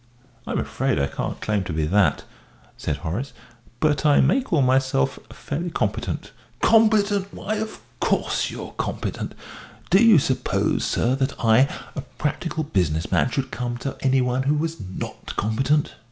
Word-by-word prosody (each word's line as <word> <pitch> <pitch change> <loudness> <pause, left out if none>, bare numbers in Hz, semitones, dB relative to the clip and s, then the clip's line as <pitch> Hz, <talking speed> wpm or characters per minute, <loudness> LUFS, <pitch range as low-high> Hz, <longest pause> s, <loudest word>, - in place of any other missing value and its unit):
"I'm - - -1
afraid - - -1
I 70 - +2
can't - - -4
claim 105 -2 0
to 90 - -4
be 80 -1 0
that," 85 -3 +2 0.5
said 75 -2 -3
Horace, 90 - -4 0.5
"but 150 -2 +2
I 150 -2 +5
may 150 - +4
call 170 - +1
myself 130 - +2
fairly 165 +5 -4
competent." 110 -7 -2 0.3
"Competent? 210 -3 +3
Why, 215 +2 -3
of 220 +1 -4 0.2
course - - 0
you're - - -7
competent. - - -3 0.6
Do 195 +5 +6
you 225 -5 +8
suppose, 135 -2 +1
sir, 125 - +1
that 135 +1 -1
I, 120 +5 +5 0.3
a 140 - -3
practical 155 +3 -3
business 85 - 0
man, - - +3
should 130 0 -2
come 120 -1 -3
to 135 +2 -4
any 135 -1 +3
one 125 +1 0
who 140 +3 +2
was 160 +2 -2
not 95 -1 -7
competent?" 135 +8 +1
135 Hz, 155 wpm, -23 LUFS, 110-160 Hz, 0.6 s, you